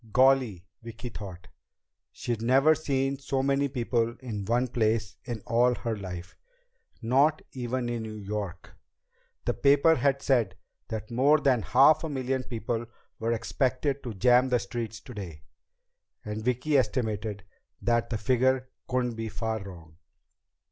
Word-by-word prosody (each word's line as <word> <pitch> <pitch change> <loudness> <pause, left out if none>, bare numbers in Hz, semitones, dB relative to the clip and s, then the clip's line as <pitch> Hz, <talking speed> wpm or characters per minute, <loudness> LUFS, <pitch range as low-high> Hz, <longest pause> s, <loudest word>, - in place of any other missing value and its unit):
Golly, 130 -8 +3 0.2
Vicki 115 +1 -7
thought, 95 -5 -9 0.6
she'd 120 -2 -3
never 135 +6 +5
seen 135 -3 -1
so 135 -1 -1
many 140 +1 +2
people 120 -3 -1
in 110 -6 -5
one 120 +4 +1
place 110 -3 0
in 120 -4 -4
all 120 +1 +3
her 115 -1 -3
life! 90 -3 -7 0.7
Not 140 +6 +3
even 125 -1 -3
in 120 -1 -2
New 110 -1 -6
York. 100 -3 -5 0.7
The - - +1
paper 145 +3 +5
had 140 -3 +1
said 115 -9 +2 0.3
that 110 0 -5
more 140 +6 +4
than 135 -5 +3
half 135 - +5
a 160 - -2
million 130 -2 -1
people 120 -1 -3 0.3
were 115 +1 0
expected 130 +4 -1
to 115 -4 -6
jam 125 +5 +4
the 125 - +3
streets 115 -2 -5
today, 95 - -9 0.8
and 105 +1 -4
Vicki 125 +4 +2
estimated 110 -4 -2 0.4
that 120 -1 +1
the 115 - -1
figure 130 +3 +1 0.2
couldn't 125 -1 0
be 115 0 -4
far 110 -1 -3
wrong. 85 -5 -11
120 Hz, 140 wpm, -28 LUFS, 110-130 Hz, 0.8 s, never